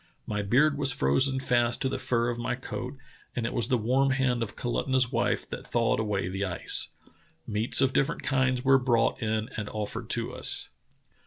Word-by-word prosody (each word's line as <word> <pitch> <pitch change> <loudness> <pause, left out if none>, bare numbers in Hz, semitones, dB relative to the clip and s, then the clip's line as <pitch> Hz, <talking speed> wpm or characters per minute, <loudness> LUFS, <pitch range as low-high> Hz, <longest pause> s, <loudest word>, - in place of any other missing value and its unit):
My 105 -1 -2
beard 140 +8 +2
was 140 -2 +5
frozen 130 - +3
fast 120 -2 +1
to - - +1
the 130 - -3
fur 120 -1 0
of 120 0 -4
my 120 - -2
coat, 130 +2 -7 0.4
and 120 - -2
it 115 - -3
was 120 - +3
the 130 - +2
warm 130 +5 +1
hand 130 -3 0
of 110 -3 -4
Kalutunah's 130 0 0
wife 120 -1 0
that - - -7
thawed 115 -2 +1
away 105 -4 -1
the 95 +2 -3
ice. 90 -3 +1 0.6
Meats 110 +4 +2
of 135 -1 +2
different 140 - 0
kinds 130 -1 0
were 135 0 +5
brought 120 0 +1
in 110 0 -1
and 105 -1 -4
offered 105 -1 -5
to - - -1
us." - - -5
120 Hz, 190 wpm, -27 LUFS, 110-130 Hz, 0.6 s, was